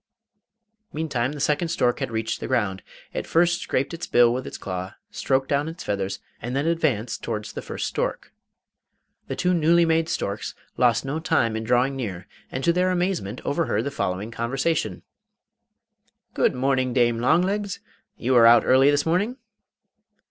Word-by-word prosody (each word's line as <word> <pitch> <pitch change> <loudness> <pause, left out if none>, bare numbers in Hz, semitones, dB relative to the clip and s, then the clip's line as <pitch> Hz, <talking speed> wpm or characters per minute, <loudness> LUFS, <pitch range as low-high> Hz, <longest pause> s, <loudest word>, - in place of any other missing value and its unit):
Meantime 145 -4 -1
the 150 - -7
second 150 +4 +1
stork 125 -7 +1
had - - -2
reached 110 0 -2
the - - -5
ground. 95 -5 0 0.3
It - - -4
first 175 +1 +2
scraped 135 +4 -1
its 165 - -5
bill 120 -1 +5
with 130 +1 -4
its - - -7
claw, 95 -1 -5 0.2
stroked 135 0 0
down 145 +2 0
its 165 +2 -7
feathers, 100 -1 -2 0.2
and 120 +3 -4
then 140 +2 0
advanced 150 -9 0
towards 105 0 -4
the - - -5
first - - -4
stork. - - -3 0.9
The - - -3
two 180 0 +1
newly 170 0 +4
made 165 0 +1
storks 100 +1 -3 0.2
lost 120 0 +2
no 145 +4 -2
time 140 -9 +1
in 110 - -3
drawing 125 +4 +2
near, 95 -9 -5 0.3
and 130 - -4
to 170 - +3
their 180 +1 +2
amazement 175 - -1
overheard 160 +3 0
the 140 - -3
following 100 -4 -3
conversation: 115 - -1 1.3
'Good - - +2
morning, 130 -1 +1
Dame 120 -2 +2
Longlegs. 185 - +1 0.4
You 130 +2 +1
are 115 -1 +8
out 120 0 +6
early 130 +2 +5
this 145 0 +2
morning! 200 +10 0
135 Hz, 165 wpm, -24 LUFS, 115-165 Hz, 1.3 s, are